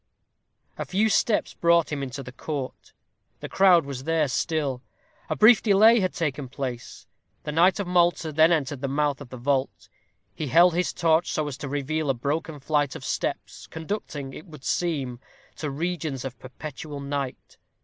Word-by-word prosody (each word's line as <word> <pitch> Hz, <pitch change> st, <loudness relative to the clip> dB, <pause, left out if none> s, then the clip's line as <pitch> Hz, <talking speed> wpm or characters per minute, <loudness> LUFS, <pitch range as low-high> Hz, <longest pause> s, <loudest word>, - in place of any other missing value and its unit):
A -, -, -2 dB
few 210 Hz, +4 st, +1 dB
steps 215 Hz, +1 st, +1 dB
brought 170 Hz, -1 st, +3 dB
him 145 Hz, -2 st, -2 dB
into 135 Hz, +1 st, -5 dB
the 125 Hz, -, -9 dB
court. 135 Hz, 0 st, -6 dB, 0.5 s
The -, -, -6 dB
crowd 180 Hz, -5 st, +5 dB
was 135 Hz, -1 st, -6 dB
there 160 Hz, -2 st, +2 dB
still. 140 Hz, -2 st, -1 dB, 0.5 s
A -, -, 0 dB
brief 220 Hz, 0 st, +7 dB
delay 220 Hz, +2 st, +6 dB
had 185 Hz, -2 st, 0 dB
taken 145 Hz, -5 st, -2 dB
place. 125 Hz, -3 st, -6 dB, 0.4 s
The 150 Hz, -, -4 dB
knight 175 Hz, +6 st, +4 dB
of 200 Hz, -, -1 dB
Malta 175 Hz, -2 st, +2 dB
then 160 Hz, +3 st, +5 dB
entered 145 Hz, -5 st, 0 dB
the 140 Hz, -, -1 dB
mouth 145 Hz, +1 st, 0 dB
of 135 Hz, -, -10 dB
the 130 Hz, -, -8 dB
vault. 135 Hz, +2 st, -1 dB, 0.4 s
He 155 Hz, -, -4 dB
held 170 Hz, +7 st, +5 dB
his 180 Hz, +2 st, 0 dB
torch 165 Hz, 0 st, +2 dB
so 155 Hz, -1 st, -1 dB
as 145 Hz, -, -4 dB
to 140 Hz, -1 st, -6 dB
reveal 145 Hz, +2 st, -2 dB
a 135 Hz, -, +2 dB
broken 150 Hz, +4 st, -3 dB
flight 145 Hz, 0 st, 0 dB
of -, -, -8 dB
steps, -, -, -4 dB
conducting, 160 Hz, -5 st, -5 dB
it 160 Hz, -, -10 dB
would 150 Hz, -5 st, -13 dB
seem, 140 Hz, -8 st, -1 dB, 0.4 s
to 150 Hz, -, -3 dB
regions 155 Hz, -3 st, -3 dB
of 125 Hz, -2 st, -7 dB
perpetual 145 Hz, +2 st, -8 dB
night. 140 Hz, -2 st, -5 dB
150 Hz, 175 wpm, -25 LUFS, 135-170 Hz, 0.5 s, brief